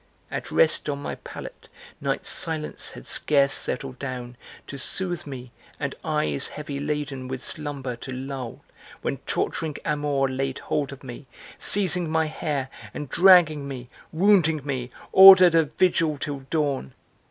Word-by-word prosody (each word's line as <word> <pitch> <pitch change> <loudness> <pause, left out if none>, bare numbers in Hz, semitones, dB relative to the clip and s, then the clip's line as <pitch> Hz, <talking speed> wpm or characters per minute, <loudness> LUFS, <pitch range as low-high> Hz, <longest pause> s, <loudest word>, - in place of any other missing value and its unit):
At - - -5
rest 155 -1 +2
on 140 -1 -3
my 145 - -5
pallet, - - -10 0.3
night's - - -2
silence 160 -2 -2
had - - -11
scarce 140 -2 +3
settled 130 0 -2
down 125 -2 -6 0.3
To 140 - -8
soothe 175 +1 0
me, 125 -3 -8 0.3
and - - -3
eyes 75 -2 +1
heavy 145 -2 -6
laden 145 -3 -4
with 130 -1 -5
slumber 140 -5 -4
to 130 - -8
lull 130 -2 -6 0.4
When - - -2
torturing 155 -3 -2
Amor 145 -3 0
laid 135 0 -3
hold 145 -2 -2
of 140 0 -11
me, 130 +2 -10 0.3
seizing 185 -4 +3
my 160 0 +1
hair 145 -3 -3 0.3
And 150 - -6
dragging 165 -5 +5
me, 125 -3 -8 0.2
wounding 165 -5 +3
me, 130 -3 -3 0.2
ordered 190 -2 +9
a 165 -1 +4
vigil 160 -1 +1
till 145 -1 -4
dawn. 140 - -2
145 Hz, 145 wpm, -24 LUFS, 130-160 Hz, 0.4 s, ordered